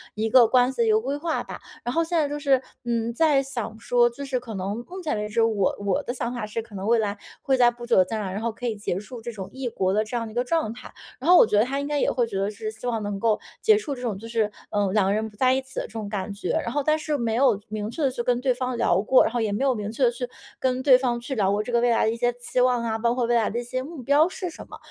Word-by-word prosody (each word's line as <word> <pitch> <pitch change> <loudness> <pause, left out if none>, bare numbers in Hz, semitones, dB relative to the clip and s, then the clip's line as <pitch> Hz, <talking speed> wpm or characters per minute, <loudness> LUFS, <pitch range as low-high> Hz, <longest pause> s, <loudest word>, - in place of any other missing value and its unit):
一 220 +1 -1
个 240 0 +7
关 250 +2 +4
系 235 -3 0
一 - - +3
个 215 - +4
规 270 +5 -3
划 320 +1 -2
吧。 - - -8 0.2
然 245 - -2
后 330 - +2
现 335 +1 -1
在 305 -3 +2
就 295 +1 -4
是， 275 -2 +3 0.2
嗯， 235 -1 -1
在 295 +1 +3
想 235 -5 -5
说， 240 +1 +3
就 280 +4 -8
是 260 -2 -1
可 235 -2 -8
能 200 +5 -3
目 370 +1 -7
前 310 -3 -1
为 210 0 -2
止， 230 +2 +1
我 215 -4 +2
我 195 -2 +1
的 245 - -3
想 245 -1 -3
法 240 -3 -3
是 215 +2 -4
可 220 -2 -13
能 190 0 -5
未 230 0 +4
来 205 -2 -1 0.2
会 270 - +2
在 240 -1 +5
不 240 0 -10
久 240 - +2
的 185 - +6
将 220 +4 -3
来， 190 -2 -4
然 205 - -4
后 230 0 -1
可 245 +3 -8
以 225 - -1
结 200 -3 -3
束 230 +3 -9
这 235 - -5
种 195 -4 -7
异 265 -1 -5
国 190 -4 0
的 215 +2 +2
这 220 +3 -6
样 230 -1 -3
一 - - -11
个 240 +2 0
状 315 -3 0
态。 245 - -11 0.3
然 275 +6 -2
后 360 - +9
我 - - +8
觉 210 - +1
得 210 - +5
他 275 +2 -2
应 285 - -3
该 295 0 0
也 - - +2
会 240 -2 +1
觉 200 -4 -4
得 195 +1 0
是 215 +1 -5
希 220 +2 -11
望 230 -2 -1
能 205 -1 -3
够 220 0 +2 0.2
结 435 -1 +5
束 310 -10 -4
这 250 - -10
种 230 -6 -2
就 225 +3 -9
是， 225 -2 0 0.2
呃， 205 -2 0
两 210 -2 +3
个 195 - +2
人 215 +1 -1
不 210 - -20
在 255 +2 +4
一 265 - +1
起 265 0 -16
的 - - -2
这 - - -19
种 220 -2 -4
感 205 -1 -3
觉。 200 - -3
然 235 - -3
后 290 +3 -1
但 305 +2 +2
是 305 -1 -1
没 230 -3 -1
有 245 -5 +3
明 215 0 -4
确 305 +7 -4
地 270 - +2
去 245 - -3
跟 245 0 +1
对 255 -1 +2
方 250 0 -3
聊 195 - +2
过， 255 +5 +5
然 - - -1
后 240 - 0
也 215 -2 0
没 210 +6 -1
有 270 -1 +3
明 210 -1 -4
确 245 +4 -2
地 245 +1 -5 0.3
跟 255 0 0
对 260 -2 +7
方 245 -2 -1
去 245 +3 -5
聊 195 -4 +2
过 205 +1 +1
这 245 - -6
个 235 - +3
未 245 - +3
来 230 -1 +3
的 220 - +2
一 - - -3
些 245 +1 +2
期 245 +1 -3
望 250 -1 +2
啊， 225 -1 -1
包 235 +1 +1
括 250 -1 +1
未 240 +1 +1
来 225 -2 +2
的 235 - -2
一 - - -4
些 255 +2 -3
目 305 0 -8
标 285 +5 +4
是 365 -1 -5
什 - - -10
么， - - -9
235 Hz, 355 characters per minute, -25 LUFS, 215-260 Hz, 0.3 s, 后